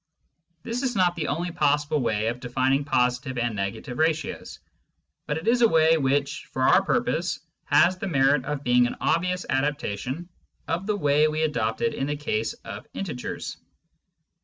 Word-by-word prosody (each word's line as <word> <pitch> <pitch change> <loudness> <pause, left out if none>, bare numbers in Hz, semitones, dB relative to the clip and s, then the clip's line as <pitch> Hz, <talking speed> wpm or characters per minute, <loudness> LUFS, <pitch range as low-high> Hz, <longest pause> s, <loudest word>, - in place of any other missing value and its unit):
This 235 +2 -3
is 255 -3 -1
not 180 -2 +3
the 160 - -2
only 170 +4 -2
possible 150 -1 +1
way 110 -4 0
of 120 +1 -4
defining 130 +3 +1
positive 125 -1 0
and 120 -2 -1
negative 100 +6 -4
ratios, 160 -2 -1 0.7
but 150 - -1
it 160 - -6
is 240 +1 +3
a 230 - +7
way 160 0 +5
which, 140 0 0
for 130 - -1
our - - +5
purpose, - - 0 0.3
has 180 +2 +4
the 195 - -3
merit 135 -4 +3
of 145 -1 -3
being 125 -1 +4
an - - -5
obvious 180 +2 0
adaptation 135 - -2 0.4
of 175 +5 -2
the 210 - +1
way 145 -2 +3
we 155 +1 -1
adopted 150 - 0
in 135 - -2
the 145 - -1
case 115 -6 -2
of - - -8
integers. 145 -11 -5
145 Hz, 165 wpm, -25 LUFS, 125-165 Hz, 0.7 s, a